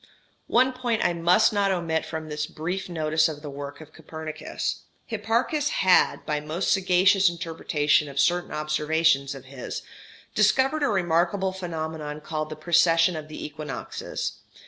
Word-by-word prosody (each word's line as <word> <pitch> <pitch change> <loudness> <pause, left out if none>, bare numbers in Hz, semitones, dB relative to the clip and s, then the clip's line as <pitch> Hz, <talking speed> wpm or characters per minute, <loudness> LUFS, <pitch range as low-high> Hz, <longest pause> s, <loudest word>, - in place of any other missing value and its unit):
One 255 +2 +3
point 245 -3 -1
I 175 - +3
must 175 +6 +4
not 200 -1 +2
omit 165 -3 -1
from 160 -1 -5
this 150 0 -3
brief 180 +5 -4
notice 155 -1 +1
of 150 -1 -8
the 145 - -6
work 140 +1 -7
of 155 0 -13
Copernicus. 160 0 -5 0.2
Hipparchus 235 +7 0 0.2
had, 185 - +4
by 150 -1 -1
most 155 +5 -2
sagacious 190 0 +4
interpretation 160 -3 0
of 140 0 -4
certain 175 +4 +2
observations 150 -2 +1
of 135 -1 -11
his, 130 -1 -7 0.5
discovered 265 +8 +3
a 285 - +3
remarkable 185 0 +1
phenomenon 160 -4 -5
called 155 0 -4
the 155 - -6
precession 165 +1 +3
of 155 -1 -6
the 155 - -7
equinoxes. 150 -7 -5
165 Hz, 145 wpm, -25 LUFS, 150-190 Hz, 0.5 s, must